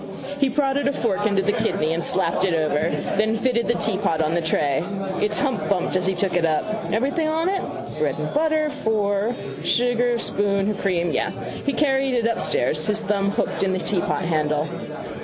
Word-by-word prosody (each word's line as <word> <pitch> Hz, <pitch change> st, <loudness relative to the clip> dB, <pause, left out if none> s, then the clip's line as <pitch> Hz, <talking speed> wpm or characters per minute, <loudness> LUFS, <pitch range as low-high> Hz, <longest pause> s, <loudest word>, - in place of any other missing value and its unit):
He 275 Hz, -2 st, +3 dB
prodded 275 Hz, 0 st, +1 dB
a 280 Hz, -, +1 dB
fork 215 Hz, -5 st, 0 dB
into 200 Hz, -2 st, +1 dB
the 205 Hz, -, +2 dB
kidney 165 Hz, -9 st, 0 dB
and 165 Hz, +1 st, -2 dB
slapped 180 Hz, 0 st, +1 dB
it 185 Hz, -3 st, +2 dB
over: 155 Hz, 0 st, +1 dB, 0.3 s
then 220 Hz, +1 st, +2 dB
fitted 235 Hz, 0 st, +1 dB
the 240 Hz, -, +2 dB
teapot 195 Hz, -7 st, 0 dB
on 155 Hz, 0 st, +1 dB
the 170 Hz, -, +1 dB
tray. 150 Hz, -2 st, +1 dB, 0.4 s
Its 210 Hz, 0 st, +1 dB
hump 265 Hz, -7 st, -1 dB
bumped 185 Hz, -2 st, 0 dB
as 185 Hz, 0 st, +1 dB
he 190 Hz, -, +1 dB
took 195 Hz, -1 st, 0 dB
it 175 Hz, -, +1 dB
up. 165 Hz, +7 st, -1 dB
Everything 280 Hz, +8 st, +1 dB
on 320 Hz, +2 st, 0 dB
it? 385 Hz, -1 st, 0 dB, 0.4 s
Bread -, -, 0 dB
and -, -, -3 dB
butter, 310 Hz, 0 st, +2 dB
four, 215 Hz, -3 st, 0 dB, 0.3 s
sugar, 245 Hz, 0 st, +2 dB
spoon, 200 Hz, -3 st, 0 dB
her 210 Hz, -, +1 dB
cream. 180 Hz, -4 st, 0 dB
Yes. -, -, -1 dB, 0.3 s
He 280 Hz, -, +2 dB
carried 270 Hz, -3 st, +2 dB
it 235 Hz, -2 st, +1 dB
upstairs, 155 Hz, -, +1 dB
his 210 Hz, 0 st, +1 dB
thumb 200 Hz, -1 st, 0 dB
hooked 205 Hz, -, -1 dB
in 190 Hz, -1 st, +1 dB
the -, -, 0 dB
teapot 190 Hz, 0 st, -1 dB
handle. 155 Hz, -2 st, 0 dB
205 Hz, 195 wpm, -23 LUFS, 180-245 Hz, 0.4 s, He